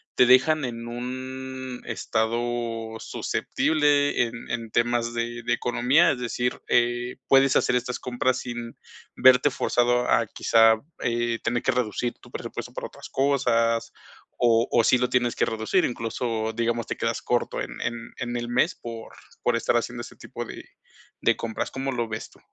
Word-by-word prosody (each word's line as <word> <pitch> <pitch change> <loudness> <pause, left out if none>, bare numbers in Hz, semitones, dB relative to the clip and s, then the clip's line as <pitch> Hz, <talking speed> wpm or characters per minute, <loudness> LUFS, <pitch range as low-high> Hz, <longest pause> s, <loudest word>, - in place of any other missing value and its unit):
te 125 - +6
dejan 135 +4 +5
en 120 -1 -6
un 130 +1 -6
estado 115 0 -2
susceptible 145 -4 +1
en 115 - -4 0.2
en 115 -1 -3
temas 120 0 +1
de 120 +1 -3
de 120 - +1
economía, 125 +6 +3
es 125 - -3
decir, 125 0 -2
eh, 120 0 +1
puedes 135 0 +5
hacer 125 - +3
estas 125 0 -3
compras 125 +1 0
sin 120 -1 -6 0.4
verte 130 +2 +6
forzado 120 -1 +1
a - - +4
quizá 115 0 +4 0.3
eh, 120 -1 0
¿tener 120 0 -1
que 130 - +3
reducir 120 -1 -1
tu - - -16
presupuesto - - -6
para - - -5
otras - - -12
cosas, 115 -4 +1 0.4
o 115 -1 +3
o 120 - +3
sí 125 - +5
lo 125 0 +1
tienes 120 -2 +1
que - - +3
reducir, 110 0 +1
incluso, 115 -1 -2
digamos, 115 +1 -1
te - - -4
quedas 115 0 -1
corto 120 -1 -1
en - - -6
en 115 0 -4
en 120 -1 -4
el 120 0 -3
mes 130 +8 +2
por 115 -1 -8 0.3
por 120 - +2
estar 115 +1 +2
haciendo 120 +1 -3
ese - - -11
tipo - - -7
de - - -8 0.6
de - - +3
compras? 110 -1 -3
¿Cómo 135 0 -3
lo 120 -2 -2
ves 110 0 -5
tú? - - -22
120 Hz, 170 wpm, -25 LUFS, 115-125 Hz, 0.6 s, te